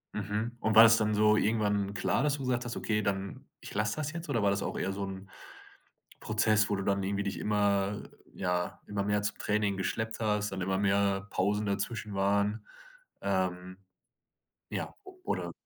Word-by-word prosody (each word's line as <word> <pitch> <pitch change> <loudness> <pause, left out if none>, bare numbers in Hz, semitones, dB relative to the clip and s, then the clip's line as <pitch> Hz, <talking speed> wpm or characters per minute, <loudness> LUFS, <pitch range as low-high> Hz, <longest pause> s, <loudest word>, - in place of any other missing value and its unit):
Mhm. 105 +3 -2
Und 110 -1 0
war 110 - +11
das 115 0 +7
dann 110 -1 +1
so 105 0 +5
irgendwann 105 -2 +1
klar, - - +1
dass 145 0 +2
du 145 - -7
gesagt 125 -1 0
hast: 120 - -4
„Okay, 105 -1 0
dann 100 -1 -3
ich - - -9
lasse 105 +1 0
das 155 -1 -3
jetzt“? 170 -1 -7
Oder 115 -6 +1
war 100 - +4
das 100 0 -1
auch - - -3
eher 95 - -1
so 100 0 -3
'n 95 0 -7 0.9
Prozess, 110 0 +2
wo 100 - +2
du 100 - -3
dann 100 0 +1
irgendwie 100 +1 -1
dich 100 - -3
immer 100 -1 +1 0.3
ja, 90 -2 -2
immer 100 -1 -2
mehr 105 0 +1
zum 105 - -2
Training 105 -2 0
geschleppt 110 +4 -2
hast, 105 -2 0
und 95 - -4
immer 95 +1 0
mehr 100 0 +2
Pausen 105 +3 0
dazwischen 100 +1 -3
waren? 100 +2 +1 0.6
Ähm, 95 -1 -1 0.9
ja, - - -4 0.3
oder - - -2
105 Hz, 185 wpm, -30 LUFS, 100-110 Hz, 0.9 s, war